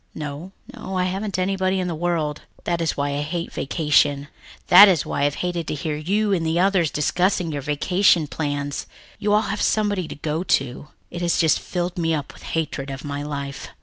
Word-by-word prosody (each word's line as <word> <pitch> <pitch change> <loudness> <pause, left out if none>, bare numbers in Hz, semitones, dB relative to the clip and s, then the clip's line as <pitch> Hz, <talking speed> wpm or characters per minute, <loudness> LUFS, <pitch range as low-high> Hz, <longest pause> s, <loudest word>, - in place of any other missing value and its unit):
"No 150 +4 -6 0.2
no, 190 0 -5
I 180 - +2
haven't 195 +2 -2
anybody 190 0 0
in 180 - -1
the 175 - -2
world. 160 -3 -1 0.2
That 170 -1 -1
is 165 - -1
why 140 0 0
I 140 +1 -2
hate 165 +3 -4
vacation, 145 -1 +1 0.4
that 195 +4 +10
is 180 -6 +2
why 140 - 0
I've 145 0 0
hated 175 -2 -2
to - - -2
hear 150 +1 -3
you 200 +7 0
and 170 -4 0
the 160 +1 0
others 185 -4 +3
discussing 175 +3 0
your 145 -1 -3
vacation 165 +4 +2
plans. 145 -1 -3 0.3
You 205 - 0
all 210 +1 +4
have 205 +1 -3
somebody 205 -5 +1
to - - -7
go 155 +2 -2
to. 135 -5 0 0.2
It 175 - -6
has 170 -1 +1
just 160 -3 +3
filled 175 0 -3
me 165 -1 +1
up 145 -2 -5
with - - -16 0.2
hatred 145 -3 -2
of 135 +2 -7
my 145 0 -4
life." 140 -1 -5
165 Hz, 205 wpm, -22 LUFS, 145-185 Hz, 0.4 s, that